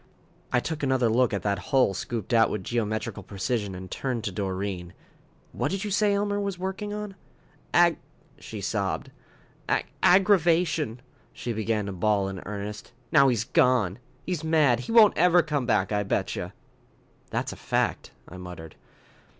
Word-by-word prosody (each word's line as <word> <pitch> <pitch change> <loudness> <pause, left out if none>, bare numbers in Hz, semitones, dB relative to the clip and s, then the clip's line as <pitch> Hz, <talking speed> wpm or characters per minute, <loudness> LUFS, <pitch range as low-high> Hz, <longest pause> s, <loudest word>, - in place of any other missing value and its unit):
I 125 - +3
took 155 +4 -4
another 130 -4 +2
look 120 +2 +3
at 100 -3 -2
that 100 -2 0
hole 130 -7 +3
scooped 115 +3 -4
out 110 -2 +5
with 105 -3 -3
geometrical 110 0 -2
precision, 100 0 -3
and 95 0 -9
turned 125 -4 -3
to 100 - -2
Doreen. 95 -2 -4 0.6
"What - - -2
did 195 +1 -3
you 210 - -3
say 205 0 +3
Elmer 205 0 0
was 200 -2 -3
working 190 +3 -4
on?" 210 -1 -5 0.6
"Agg 170 -2 +4 0.2
" - - -29
she - - -8
sobbed, - - -2 0.6
"agg - - +1 0.2
agg 185 +2 +6
aggravation." 165 - +2 0.3
She 120 - -4
began 110 -1 -1
to 100 - -4
bawl 100 +1 +1
in 95 -1 -6
earnest. 105 0 -6 0.2
"Now 140 -3 +6
he's 120 -5 +1
gone. 115 -5 +2 0.3
He's 180 -4 -3
mad. 155 -7 +3
He 125 - -6
won't 225 -3 +7
ever 175 0 +5
come 145 -5 -2
back, 105 -5 +1
I 105 -1 +1
betcha." 100 - -2 0.8
"That's - - -2
a - - -9
fact," - - -1 0.2
I 90 - -10
muttered. 90 -3 -9
120 Hz, 165 wpm, -26 LUFS, 100-170 Hz, 0.8 s, won't